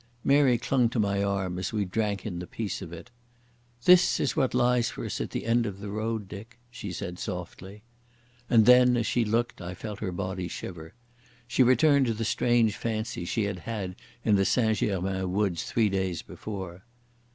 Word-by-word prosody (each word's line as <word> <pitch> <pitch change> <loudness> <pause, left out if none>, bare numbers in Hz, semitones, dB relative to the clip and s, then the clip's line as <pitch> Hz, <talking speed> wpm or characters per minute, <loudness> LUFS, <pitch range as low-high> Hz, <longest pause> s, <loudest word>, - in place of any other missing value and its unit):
Mary 140 -3 +4
clung 125 -1 +1
to 120 - -4
my 100 -2 +1
arm 95 -3 -1
as 95 - -3
we 105 -2 -1
drank 100 0 -2
in 90 -5 -4
the 90 - -6
peace 110 -3 -4
of 85 -4 -8
it. 85 +4 -10 0.7
"That 180 0 +6
is - - 0
what 135 -5 +1
lies 120 -1 +3
for - - -6
us - - -3
at - - -3
the - - -4
end 115 0 +2
of 100 -1 -6
the 100 0 -6
road, 110 -1 -3
Dick," 110 +5 -10
she 110 -5 -6
said 90 0 -6
softly. 95 +3 -7 0.7
And 115 -2 +5
then, 125 0 +6
as 115 - 0
she 120 - +1
looked, 115 +1 -1
I 90 +1 -6
felt 105 +2 -7
her 95 -4 -3
body 95 0 -3
shiver. 85 0 -8 0.5
She 125 - +1
returned 130 +2 +5
to 115 - 0
the 115 +1 -3
strange 115 -1 +2
fancy 110 -5 -3
she 110 +5 -1
had 100 -2 -3
had 100 -4 -5 0.3
in 105 -2 +4
the 95 - +3
St 110 +1 +2
Germains 95 -1 -1
woods 95 -1 -1
three 110 -3 +1
days 95 -3 -2
before. 95 -3 -7
105 Hz, 195 wpm, -27 LUFS, 95-115 Hz, 0.7 s, That